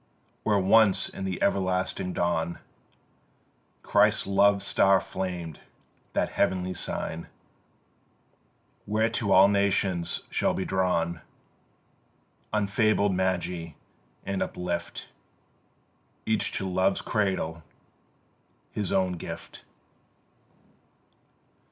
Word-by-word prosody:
Where 105 Hz, -2 st, +2 dB
once 100 Hz, +1 st, +4 dB
in 95 Hz, -, -6 dB
the 95 Hz, -2 st, -3 dB
everlasting 95 Hz, -1 st, 0 dB
dawn 85 Hz, -1 st, -1 dB, 1.3 s
Christ's -, -, +3 dB
Love 100 Hz, 0 st, +3 dB
star 95 Hz, 0 st, +4 dB
flamed, 90 Hz, -5 st, -5 dB, 0.5 s
that -, -, +1 dB
heavenly 90 Hz, 0 st, 0 dB
sign 85 Hz, -2 st, -4 dB, 1.6 s
Whereto 110 Hz, +1 st, 0 dB
all 95 Hz, +1 st, +8 dB
nations 100 Hz, -4 st, +1 dB
shall -, -, +1 dB
be 95 Hz, -, -2 dB
drawn, 85 Hz, -3 st, 0 dB, 1.3 s
Unfabled 105 Hz, -1 st, +2 dB
Magi, 90 Hz, -3 st, -1 dB, 0.5 s
and 100 Hz, -1 st, -2 dB
uplift 85 Hz, -1 st, -4 dB, 1.2 s
Each 110 Hz, -1 st, 0 dB
to 95 Hz, -, -2 dB
Love's 95 Hz, +1 st, +1 dB
cradle 95 Hz, -6 st, -1 dB, 1.1 s
his 105 Hz, -3 st, -3 dB
own 95 Hz, -2 st, +1 dB
gift. -, -, -8 dB
95 Hz, 85 wpm, -27 LUFS, 90-100 Hz, 1.6 s, all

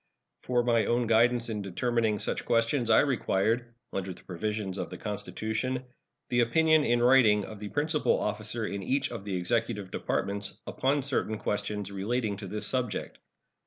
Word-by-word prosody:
For 125 Hz, -1 st, +1 dB
my 115 Hz, -3 st, +3 dB
own 120 Hz, +1 st, +2 dB
guidance 115 Hz, +1 st, +3 dB
in 105 Hz, -2 st, -2 dB
determining 110 Hz, +3 st, 0 dB
such -, -, -2 dB
questions 115 Hz, +1 st, +1 dB
I 110 Hz, -, +7 dB
required 120 Hz, -2 st, 0 dB, 0.2 s
(under 95 Hz, -1 st, -3 dB
the -, -, -17 dB
provisions 100 Hz, +1 st, -3 dB
of 90 Hz, -3 st, -3 dB
the 90 Hz, -, -7 dB
Constitution) 110 Hz, +4 st, -3 dB, 0.5 s
the 120 Hz, -, +2 dB
opinion 155 Hz, +6 st, +4 dB
in 120 Hz, -2 st, +2 dB
writing 115 Hz, -5 st, +5 dB
of 110 Hz, -2 st, -9 dB
the 105 Hz, 0 st, -6 dB
principal 150 Hz, +3 st, +1 dB
officer 110 Hz, +2 st, -2 dB
in 100 Hz, -1 st, -4 dB
each 135 Hz, +9 st, 0 dB
of 115 Hz, -5 st, -6 dB
the 100 Hz, -2 st, -2 dB
Executive 105 Hz, +1 st, -1 dB
Departments 100 Hz, 0 st, -2 dB
upon 140 Hz, +1 st, 0 dB
certain 130 Hz, -5 st, -1 dB
questions 105 Hz, -1 st, -3 dB
relating 105 Hz, +2 st, -1 dB
to 100 Hz, -1 st, -7 dB
this 105 Hz, +3 st, -4 dB
subject. 125 Hz, -6 st, -2 dB
110 Hz, 160 wpm, -29 LUFS, 105-120 Hz, 0.5 s, I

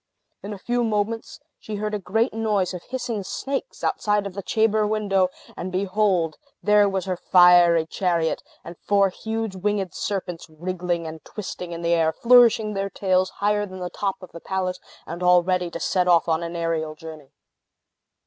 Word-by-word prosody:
In 200 Hz, -, -7 dB
a 205 Hz, -, -5 dB
few 240 Hz, +5 st, -1 dB
moments, 220 Hz, +1 st, -2 dB, 0.2 s
she 215 Hz, -, -6 dB
heard 210 Hz, +1 st, -3 dB
a 210 Hz, -, -1 dB
great 225 Hz, +6 st, 0 dB
noise 210 Hz, -4 st, 0 dB
of 180 Hz, -, -6 dB
hissing 245 Hz, -4 st, -3 dB
snakes 275 Hz, -, -5 dB
outside 210 Hz, -1 st, +1 dB
of 200 Hz, -, -5 dB
the 200 Hz, -, -5 dB
chamber 215 Hz, +1 st, +1 dB
window; 200 Hz, -3 st, +1 dB, 0.3 s
and 185 Hz, +2 st, -5 dB
behold! 185 Hz, -3 st, +1 dB, 0.2 s
there 210 Hz, -1 st, +4 dB
was 195 Hz, -1 st, -2 dB
her 185 Hz, -1 st, -1 dB
fiery 175 Hz, -2 st, +5 dB
chariot, 170 Hz, -1 st, 0 dB, 0.2 s
and 170 Hz, 0 st, -10 dB
four 200 Hz, -1 st, +3 dB
huge 220 Hz, +1 st, -4 dB
winged 195 Hz, -1 st, -1 dB
serpents, 180 Hz, -4 st, -4 dB
wriggling 175 Hz, +1 st, -3 dB
and 160 Hz, 0 st, -8 dB
twisting 180 Hz, -4 st, -7 dB
in 170 Hz, 0 st, -6 dB
the 170 Hz, 0 st, +2 dB
air, 165 Hz, -1 st, +3 dB
flourishing 230 Hz, 0 st, +5 dB
their 195 Hz, 0 st, -2 dB
tails 185 Hz, -1 st, +1 dB
higher 205 Hz, 0 st, +1 dB
than 185 Hz, -1 st, -9 dB
the 180 Hz, -1 st, -5 dB
top 195 Hz, -2 st, -2 dB
of 185 Hz, -, -11 dB
the 170 Hz, -, -10 dB
palace, 185 Hz, -1 st, -2 dB, 0.3 s
and 170 Hz, +2 st, -7 dB
all 180 Hz, -1 st, +5 dB
ready 180 Hz, -1 st, 0 dB
to 170 Hz, -, -6 dB
set 180 Hz, +2 st, +1 dB
off 175 Hz, -1 st, +4 dB
on 160 Hz, 0 st, +1 dB
an 170 Hz, 0 st, -5 dB
aerial 165 Hz, -2 st, -2 dB
journey. 155 Hz, -3 st, -11 dB
185 Hz, 180 wpm, -23 LUFS, 175-210 Hz, 0.3 s, fiery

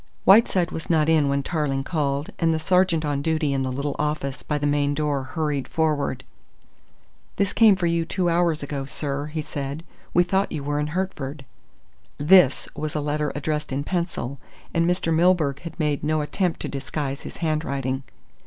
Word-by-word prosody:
Whiteside 190 Hz, -3 st, +5 dB
was 160 Hz, -, -6 dB
not 160 Hz, -2 st, +3 dB
in 155 Hz, -3 st, +4 dB
when 140 Hz, 0 st, 0 dB
Tarling 140 Hz, -4 st, -1 dB
called, 145 Hz, -2 st, -1 dB
and 165 Hz, -1 st, +3 dB
the -, -, -1 dB
sergeant 180 Hz, -2 st, +2 dB
on 145 Hz, -1 st, -1 dB
duty 155 Hz, -2 st, 0 dB
in 135 Hz, -, 0 dB
the 130 Hz, -1 st, -1 dB
little 140 Hz, +2 st, -2 dB
office 150 Hz, -2 st, -2 dB
by 150 Hz, -, -2 dB
the 145 Hz, -, -2 dB
main 145 Hz, 0 st, +1 dB
door 145 Hz, -2 st, 0 dB
hurried 140 Hz, +1 st, -2 dB
forward. 150 Hz, -5 st, 0 dB, 1.1 s
"This 200 Hz, -1 st, 0 dB
came 220 Hz, -3 st, +6 dB
for 185 Hz, -2 st, -2 dB
you 170 Hz, 0 st, +1 dB
two 180 Hz, +2 st, -1 dB
hours 170 Hz, -3 st, +2 dB
ago, 140 Hz, -1 st, -4 dB
sir," 140 Hz, +1 st, -3 dB
he 155 Hz, 0 st, -4 dB
said 145 Hz, +1 st, -5 dB, 0.3 s
"We 175 Hz, -, +4 dB
thought 190 Hz, +2 st, 0 dB
you 145 Hz, -, -4 dB
were 145 Hz, +1 st, -1 dB
in 150 Hz, -, -1 dB
Hertford." 145 Hz, -7 st, -4 dB, 0.7 s
"This" 160 Hz, -1 st, +5 dB
was 155 Hz, 0 st, -4 dB
a -, -, +1 dB
letter 150 Hz, 0 st, -1 dB
addressed 150 Hz, +1 st, -2 dB
in 135 Hz, +2 st, -1 dB
pencil, 170 Hz, -6 st, -3 dB, 0.3 s
and 170 Hz, 0 st, +2 dB
Mr. 175 Hz, -2 st, +1 dB
Milburgh 160 Hz, -4 st, +3 dB
had 170 Hz, 0 st, -9 dB
made 150 Hz, -2 st, 0 dB
no 155 Hz, +1 st, +1 dB
attempt 175 Hz, +3 st, -1 dB
to -, -, -2 dB
disguise 140 Hz, 0 st, -4 dB
his -, -, -9 dB
handwriting. 140 Hz, -5 st, -1 dB
150 Hz, 180 wpm, -24 LUFS, 140-165 Hz, 1.1 s, came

